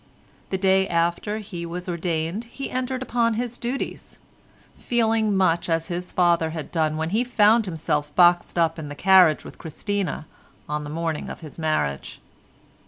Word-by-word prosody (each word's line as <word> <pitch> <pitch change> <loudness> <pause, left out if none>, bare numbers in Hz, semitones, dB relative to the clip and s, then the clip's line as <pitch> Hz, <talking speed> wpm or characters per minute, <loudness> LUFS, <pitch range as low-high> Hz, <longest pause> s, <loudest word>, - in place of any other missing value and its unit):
The 190 - -1
day 190 0 +3
after 170 +5 0
he 195 -5 -7
was 175 +2 -6
ordained 170 +4 -2
he 270 +4 -7
entered 255 0 -2
upon 235 -2 +1
his 240 +1 -4
duties—feeling 225 -3 -3
much 175 -2 +2
as 165 0 0
his 180 +1 -4
father 170 -2 +2
had 160 -1 -6
done 155 -2 0
when 160 +1 -2
he 225 +4 +2
found 225 -2 +4
himself 150 -3 -2
boxed 175 0 +4
up 165 -1 +2
in 150 -2 -6
the 145 - -7
carriage 185 -3 +5
with - - -11
Christina 185 +1 -3 0.4
on 150 0 -2
the 145 - -7
morning 160 0 -3
of - - -8
his 155 0 -9
marriage. 155 - -1
175 Hz, 160 wpm, -24 LUFS, 160-215 Hz, 0.4 s, carriage